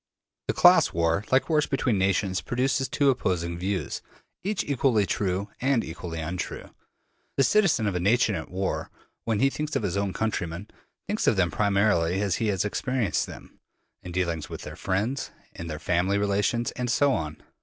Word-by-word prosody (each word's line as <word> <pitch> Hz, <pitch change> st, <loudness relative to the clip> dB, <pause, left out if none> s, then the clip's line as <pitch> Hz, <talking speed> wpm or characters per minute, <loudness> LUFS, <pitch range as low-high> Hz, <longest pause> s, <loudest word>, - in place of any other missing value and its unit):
The -, -, 0 dB
class -, -, +6 dB
war, 85 Hz, +3 st, +1 dB
like 130 Hz, +1 st, +4 dB
wars 155 Hz, -2 st, +2 dB
between 125 Hz, -6 st, +1 dB
nations, 95 Hz, 0 st, +1 dB
produces 135 Hz, +2 st, 0 dB
two 140 Hz, 0 st, +3 dB
opposing 85 Hz, -8 st, -1 dB
views, 95 Hz, -5 st, -2 dB, 0.4 s
each 205 Hz, +1 st, -1 dB
equally 130 Hz, -6 st, +2 dB
true 95 Hz, +1 st, -1 dB
and 130 Hz, -3 st, +2 dB
equally 80 Hz, 0 st, -6 dB
untrue. 85 Hz, +3 st, -5 dB, 0.7 s
The 135 Hz, -, +5 dB
citizen 185 Hz, -, +3 dB
of 100 Hz, -, 0 dB
a 90 Hz, -, -1 dB
nation 105 Hz, +4 st, +3 dB
at 80 Hz, -4 st, -4 dB
war, 95 Hz, +1 st, -2 dB, 0.4 s
when 110 Hz, -1 st, 0 dB
he 135 Hz, 0 st, +4 dB
thinks 150 Hz, 0 st, -4 dB
of 135 Hz, -, 0 dB
his 95 Hz, +1 st, -1 dB
own 100 Hz, -1 st, 0 dB
countrymen, 95 Hz, -3 st, -3 dB, 0.4 s
thinks 210 Hz, +1 st, -1 dB
of -, -, +5 dB
them 90 Hz, -3 st, +2 dB
primarily 100 Hz, -4 st, +2 dB
as 100 Hz, -3 st, 0 dB
he 115 Hz, -, 0 dB
has 100 Hz, -1 st, 0 dB
experienced 120 Hz, -1 st, 0 dB
them, -, -, -12 dB, 0.4 s
in 90 Hz, -, -8 dB
dealings 85 Hz, -3 st, -2 dB
with -, -, -7 dB
their -, -, -7 dB
friends, 110 Hz, +9 st, -1 dB, 0.2 s
in 85 Hz, -, -7 dB
their 75 Hz, -2 st, -4 dB
family 90 Hz, +5 st, +1 dB
relations, 105 Hz, +4 st, +1 dB
and 125 Hz, 0 st, -3 dB
so 140 Hz, +4 st, +3 dB
on. 75 Hz, -5 st, -3 dB
100 Hz, 175 wpm, -26 LUFS, 90-125 Hz, 0.7 s, class